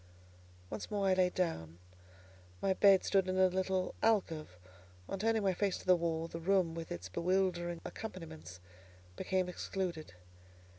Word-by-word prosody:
Once 110 Hz, -2 st, -5 dB
more 200 Hz, -2 st, +1 dB
I -, -, +5 dB
lay 185 Hz, -1 st, +3 dB
down. 85 Hz, -, -2 dB, 0.8 s
My 195 Hz, -, +2 dB
bed 195 Hz, 0 st, +6 dB
stood 190 Hz, -1 st, +2 dB
in 185 Hz, -, 0 dB
a 190 Hz, -, +6 dB
little 190 Hz, 0 st, -1 dB
alcove; 165 Hz, -, +1 dB, 0.5 s
on 195 Hz, -, -4 dB
turning 225 Hz, +1 st, +1 dB
my 190 Hz, -1 st, +2 dB
face 195 Hz, +1 st, 0 dB
to -, -, -12 dB
the 185 Hz, 0 st, +6 dB
wall, 165 Hz, -1 st, -1 dB
the 165 Hz, -, -6 dB
room 180 Hz, -1 st, +2 dB
with 165 Hz, 0 st, -6 dB
its 90 Hz, +2 st, -5 dB
bewildering 175 Hz, -, 0 dB
accompaniments 95 Hz, -, -8 dB, 0.6 s
became 185 Hz, -, 0 dB
excluded. 180 Hz, -, -4 dB
185 Hz, 150 wpm, -34 LUFS, 165-190 Hz, 0.8 s, bed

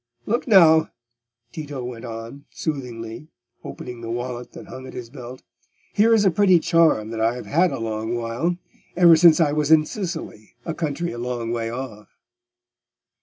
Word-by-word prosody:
"Look 235 Hz, +5 st, -1 dB
now," 160 Hz, -7 st, +6 dB, 0.6 s
Tito 145 Hz, -4 st, -6 dB
went 120 Hz, -1 st, -7 dB
on, 115 Hz, +4 st, -8 dB
soothingly, 125 Hz, -3 st, -5 dB, 0.4 s
opening 125 Hz, -1 st, -8 dB
the 115 Hz, -, -6 dB
wallet 120 Hz, +1 st, -5 dB
that -, -, -10 dB
hung 130 Hz, 0 st, -10 dB
at -, -, -11 dB
his 120 Hz, -2 st, -8 dB
belt, 130 Hz, -2 st, -10 dB, 0.5 s
"here 220 Hz, +3 st, +4 dB
is 220 Hz, -2 st, +4 dB
a 190 Hz, -, +5 dB
pretty 185 Hz, +1 st, +4 dB
charm 160 Hz, -10 st, +2 dB
that 115 Hz, -1 st, -4 dB
I 115 Hz, +2 st, +2 dB
have 125 Hz, -, -7 dB
had 170 Hz, +4 st, +2 dB
a -, -, -3 dB
long 110 Hz, 0 st, -3 dB
while—ever 170 Hz, +7 st, +1 dB
since 165 Hz, 0 st, +6 dB
I 155 Hz, -3 st, +3 dB
was 150 Hz, 0 st, 0 dB
in 160 Hz, -1 st, +6 dB
Sicily, 165 Hz, -, -6 dB
a 165 Hz, -, -3 dB
country 165 Hz, +1 st, -3 dB
a 120 Hz, -, -7 dB
long 120 Hz, -1 st, -3 dB
way 115 Hz, -1 st, -2 dB
off." 115 Hz, -3 st, -7 dB
130 Hz, 170 wpm, -22 LUFS, 115-165 Hz, 0.6 s, now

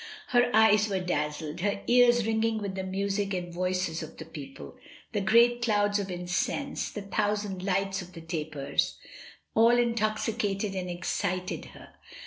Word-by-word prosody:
Her 245 Hz, -1 st, +4 dB
eyes 215 Hz, -1 st, +5 dB
were 195 Hz, -2 st, 0 dB
dazzled, 150 Hz, -2 st, -2 dB
her 200 Hz, +2 st, 0 dB
ears 240 Hz, -2 st, +5 dB
ringing 225 Hz, 0 st, +1 dB
with 200 Hz, -3 st, -3 dB
the 190 Hz, -, -3 dB
music 195 Hz, +1 st, -1 dB
and 175 Hz, -1 st, -4 dB
the 170 Hz, -, -11 dB
voices 185 Hz, -2 st, -1 dB
of -, -, -9 dB
the 160 Hz, -, -8 dB
people: 135 Hz, -, -9 dB, 0.4 s
the 205 Hz, -, -1 dB
great 235 Hz, +4 st, +4 dB
clouds 205 Hz, -3 st, +2 dB
of 200 Hz, -1 st, -3 dB
incense, 180 Hz, +10 st, -2 dB
the 210 Hz, -, -6 dB
thousand 205 Hz, -1 st, -1 dB
lights 195 Hz, 0 st, 0 dB
of 180 Hz, 0 st, -11 dB
the 165 Hz, -, -9 dB
tapers, 155 Hz, -4 st, -2 dB, 0.6 s
all 230 Hz, +2 st, +5 dB
intoxicated 215 Hz, -3 st, 0 dB
and 185 Hz, -1 st, -3 dB
excited 180 Hz, +1 st, -2 dB
her. -, -, -13 dB
195 Hz, 155 wpm, -28 LUFS, 180-215 Hz, 0.6 s, eyes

